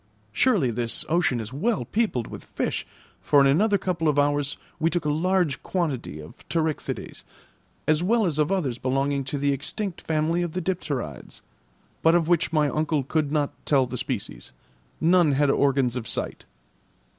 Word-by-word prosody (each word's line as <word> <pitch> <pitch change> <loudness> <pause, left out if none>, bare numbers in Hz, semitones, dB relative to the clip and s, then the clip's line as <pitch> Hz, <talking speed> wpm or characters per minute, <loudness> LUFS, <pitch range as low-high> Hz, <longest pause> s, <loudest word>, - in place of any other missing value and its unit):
Surely 175 - +2
this 115 0 -2
ocean 165 -7 +2
is 110 +2 -6
well 215 - 0
peopled 210 - 0
with - - -9
fish, - - -3 0.3
for 145 - +4
in 140 - +6
another 200 +10 +4
couple 175 -4 -1
of 150 -1 +2
hours 145 0 +1 0.2
we 165 +1 +2
took 175 -2 -2
a 150 - +2
large 175 -1 +1
quantity 145 - -2
of 75 +1 -10 0.2
pterichthydes, 160 -2 -2 0.6
as 155 +1 +3
well 220 +4 +2
as 155 -4 -1
of 150 +4 +2
others 140 -11 -1
belonging 135 +2 0
to 135 +2 -4
the 140 0 +1
extinct 180 - -4
family 160 +2 0
of 175 -2 -3
the 185 - -2
dipterides, 145 - -4 0.6
but 165 +1 +5
of 170 -2 +2
which 175 0 +2
my 155 -2 +3
uncle 155 -1 0
could 150 +1 -1
not 150 -2 0
tell 135 -3 +3
the 125 0 -6
species; 60 - -4 0.5
none 170 -2 +4
had 140 0 +3
organs 135 -4 +2
of 120 -3 -4
sight. - - -4
150 Hz, 170 wpm, -25 LUFS, 135-175 Hz, 0.6 s, in